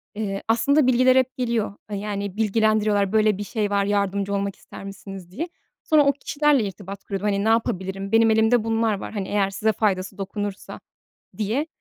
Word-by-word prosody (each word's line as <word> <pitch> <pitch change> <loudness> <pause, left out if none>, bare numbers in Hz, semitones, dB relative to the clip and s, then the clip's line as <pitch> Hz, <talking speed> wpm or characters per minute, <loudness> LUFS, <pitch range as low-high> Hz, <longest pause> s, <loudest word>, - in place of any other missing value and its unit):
eee, 200 -2 -3
aslında 275 +5 +3
bilgiler 255 +1 +4
hep 260 0 +2
geliyor, 230 -5 -1 0.2
eee, 205 - -2
yani, 200 -1 -4
bilgilendiriyorlar, 215 -2 +2
"Böyle 215 -2 +3
bir 205 - -4
şey 210 0 -2
var, 200 -1 +1
yardımcı 200 0 0
olmak 200 0 -2
ister - - -12
misiniz?" 195 -2 -9
diye. 320 - -4 0.4
Sonra 305 -2 +4
o 280 - +4
kişilerle 285 -2 +1
irtibat 200 0 -7
kurup, 195 -2 -4
hani, 200 -1 +1
"Ne 220 - +2
yapabilirim? 195 -3 -1
Benim 225 0 +5
elimde 220 +1 +3
bunlar 225 0 +1
var, - - -7
hani, 200 -3 -3
eğer 200 -1 +1
size 220 +3 0
faydası 195 -2 -1
dokunursa." 205 0 -5 0.6
diye. 225 +8 -1
210 Hz, 180 wpm, -23 LUFS, 200-225 Hz, 0.6 s, Benim